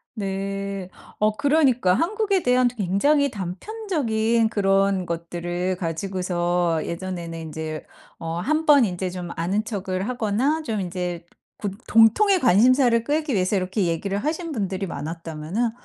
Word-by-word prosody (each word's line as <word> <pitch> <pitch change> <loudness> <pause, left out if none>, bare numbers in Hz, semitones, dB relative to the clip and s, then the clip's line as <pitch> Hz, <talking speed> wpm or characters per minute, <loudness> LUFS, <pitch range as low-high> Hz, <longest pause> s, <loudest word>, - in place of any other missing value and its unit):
네. 195 -1 -4 0.3
어 215 0 +2
그러니까 275 -9 +3
한국에 400 - +1
대한 250 0 +4
굉장히 245 +7 +1
단편적인 225 - -1
그런 195 -2 +2
것들을 175 +2 -3
가지고서 175 -1 -1
예전에는 170 -1 -5
인제 160 -1 -5 0.4
어 165 0 -4
1 310 - 0
번 285 -5 +7
인제 185 -1 -3
좀 180 -1 -6
아는 190 +6 0
척을 190 -3 -3
하거나 250 +6 0
좀 220 -8 -2
인제 180 -1 -4 0.3
구 205 -2 -3 0.2
공통의 370 - +5
관심사를 240 +2 +4
끌기 300 +2 -1
위해서 185 0 +1
이렇게 190 +1 0
얘기를 195 +4 -1
하신 320 - -3
분들이 195 -6 -2
많았다면은 165 +7 -3
195 Hz, 290 characters per minute, -23 LUFS, 180-250 Hz, 0.4 s, 번